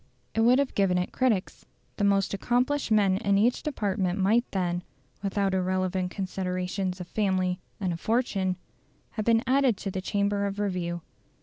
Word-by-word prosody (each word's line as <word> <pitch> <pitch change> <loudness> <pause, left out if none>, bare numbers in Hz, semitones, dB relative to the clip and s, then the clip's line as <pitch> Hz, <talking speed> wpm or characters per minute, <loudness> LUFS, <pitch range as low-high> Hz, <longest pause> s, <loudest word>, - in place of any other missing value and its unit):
It 225 - +1
would 245 +3 +6
have 280 -1 0
given 190 -3 +2
it 180 - -1
critics. 230 -8 0 0.3
The 205 - -1
most 200 -1 +2
accomplished 250 +7 0
men 200 -3 +4
in 200 -2 +2
each 235 +5 +2
department 200 -9 -1
might 215 +5 +2
then, 175 -2 -1 0.4
without 195 -1 0
irrelevant 185 0 0
considerations 185 0 -3
of 180 - -6
family 185 -3 0 0.2
and 185 -4 -1
of 165 - -6
fortune, 200 -5 0 0.6
have 215 -2 -3
been 230 0 +4
added 260 -4 +3
to 195 - -4
the 190 - -3
Chamber 200 +1 0
of 200 0 -5
Review. 180 -4 -2
195 Hz, 165 wpm, -27 LUFS, 185-220 Hz, 0.6 s, would